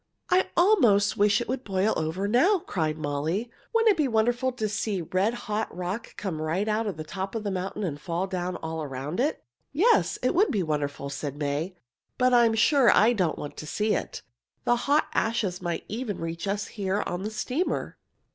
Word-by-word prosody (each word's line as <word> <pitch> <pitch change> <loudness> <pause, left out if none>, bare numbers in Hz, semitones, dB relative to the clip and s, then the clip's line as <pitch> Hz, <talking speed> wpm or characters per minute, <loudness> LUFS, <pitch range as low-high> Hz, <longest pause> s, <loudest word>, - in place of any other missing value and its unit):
"I 370 +1 +3
almost 240 - +4
wish 205 +1 +3
it - - -4
would 260 +1 -3
boil 195 +1 +1
over 160 +5 -1
now!" 320 - +4
cried 155 -4 -1
Molly. 155 +10 -2 0.2
"Wouldn't 455 -1 +5
it 390 - 0
be 300 -3 +2
wonderful 240 +2 +1
to 220 -3 -2
see 210 -2 -2
red 190 +8 0
hot 215 0 -1
rock 185 +6 -5
come 175 -6 -3
right 170 +7 -1
out 220 +1 0
of 195 - -3
the 155 - -4
top 190 +6 -5
of 220 - -2
the 205 - -2
mountain 190 +3 -3
and 145 -6 -3
fall 170 +3 -2
down 185 -1 -3
all 160 0 -3
around 140 - -4
it!" 290 +5 0 0.3
"Yes, 420 +11 +3
it - - +2
would 400 +4 +4
be 205 -8 0
wonderful," 145 -3 -2
said 140 0 -4
May, 150 +5 -2 0.4
"but 255 0 +3
I 240 -1 +6
am 225 - +1
sure 255 +3 +5
I 225 +3 +5
don't 180 -8 0
want 145 - -6
to 155 - -7
see 210 +6 0
it. - - -3 0.4
The 240 - +3
hot 285 +5 +2
ashes 215 -5 0
might 175 -2 -3
even 220 -2 -4
reach 165 +3 -4
us 200 +1 -1
here 200 -1 -1
on 175 - -3
the 210 - -3
steamer." 255 +10 -2
205 Hz, 205 wpm, -27 LUFS, 170-240 Hz, 0.4 s, I